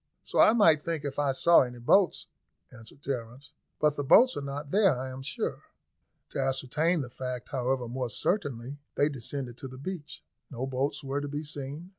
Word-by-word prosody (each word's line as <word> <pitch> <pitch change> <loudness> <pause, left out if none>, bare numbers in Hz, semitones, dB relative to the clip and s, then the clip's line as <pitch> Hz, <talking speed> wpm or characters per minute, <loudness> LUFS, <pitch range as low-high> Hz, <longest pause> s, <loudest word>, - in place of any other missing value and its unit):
"So - - -2
I - - +7
might 165 -10 +5
think 165 -4 -3
if 140 0 -3
I 145 -2 +2
saw 170 +6 +5
any 125 -1 -3
boats," 175 +10 +3 0.5
answered 125 +4 -15
Terence. 125 0 -5 0.3
"But 150 -1 +2
the 145 - -1
boats 250 - +6
are - - -3
not 140 +1 -6
there, 195 -8 +4
I 130 0 -4
am 130 +1 -7
sure." 130 - -3 0.7
To - - -5
ascertain 135 +6 +1
the 125 - -6
fact, 125 -1 -5
however, 130 -1 -1
more 125 +1 -3
certainly, 140 - -2 0.2
they 145 - +3
descended 130 -2 -5
to 135 - -6
the 130 0 -10
beach. 155 0 -7 0.3
No 130 -2 -4
boats 135 +3 -2
were 140 +1 -2
to 145 - -4
be 145 +2 -4
seen. 145 +3 -6
140 Hz, 190 wpm, -29 LUFS, 130-150 Hz, 0.7 s, I